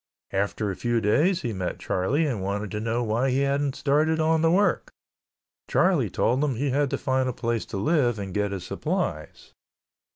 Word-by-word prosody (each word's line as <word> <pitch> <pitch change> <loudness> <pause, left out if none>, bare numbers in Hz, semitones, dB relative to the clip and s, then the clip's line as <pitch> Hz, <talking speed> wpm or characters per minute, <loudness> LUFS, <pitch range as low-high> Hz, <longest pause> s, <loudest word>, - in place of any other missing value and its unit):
After 100 +1 -1
a - - -5
few 120 +2 0
days 150 - +2
he 120 -3 -2
met 95 -2 -3
Charlie 135 - 0
and 120 -9 -2
wanted 100 +1 -3
to 105 - -3
know 115 +2 -1
why 115 +4 0
he 130 +2 +1
hadn't 140 0 0
started 155 +3 +1
on 160 0 +2
the 165 - +4
work. 185 +2 +2 0.8
Charlie - - +2
told 130 +5 +1
him 140 -4 0
he 135 +3 -1
had 140 +1 +1
to - - -1
find 130 -1 0
a - - -3
place 115 -2 -2
to - - -5
live 120 - +2
and 100 -2 -5
get 105 0 0
his 95 -3 -4
supplies. - - -4
125 Hz, 195 wpm, -25 LUFS, 105-145 Hz, 0.8 s, the